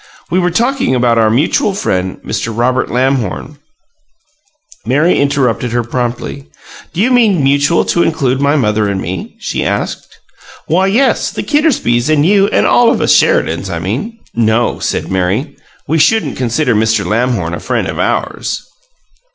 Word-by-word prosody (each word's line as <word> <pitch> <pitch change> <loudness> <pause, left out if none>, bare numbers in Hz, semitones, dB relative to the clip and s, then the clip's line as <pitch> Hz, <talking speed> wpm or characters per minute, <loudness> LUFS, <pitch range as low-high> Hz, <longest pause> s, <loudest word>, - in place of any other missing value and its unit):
We 185 - +2
were 180 -1 +1
talking 235 - 0
about 120 -2 +2
our 110 -1 +3
mutual 150 - +1
friend, 95 - -2
Mr. 115 - -3
Robert 125 +2 +1
Lamhorn 130 +2 -1 0.6
" 305 -1 -44 0.2
Mary 150 +8 +2
interrupted 130 -4 0
her 120 0 0
promptly. 120 - -4 0.4
"Do 170 +5 -2
you 250 +4 +2
mean 215 - +3
'mutual' 140 +4 +2
to 170 - +1
include 135 -6 0
my 140 +1 +2
mother 105 -6 +1
and 100 -1 -2
me?" 90 +1 -6
she - - -3
asked. - - -4 0.5
"Why, 185 +4 +1
yes; 240 +8 +2
the - - -5
Kittersbys 245 - +1
and 150 -1 +3
you 200 +2 +4
and 215 - +1
all 240 -1 +4
of - - +1
us - - +3
Sheridans, - - +1
I - - -3
mean." 230 +1 -4 0.2
"No," 115 +1 +1
said - - -3
Mary. 95 - -1 0.3
"We 160 +1 +1
shouldn't 220 +9 +2
consider 125 +2 0
Mr. 110 -1 +1
Robert 90 - -4
Lamhorn 115 -7 0
a - - -4
friend - - -2
of - - -5
ours." - - -2
135 Hz, 165 wpm, -13 LUFS, 115-180 Hz, 0.6 s, you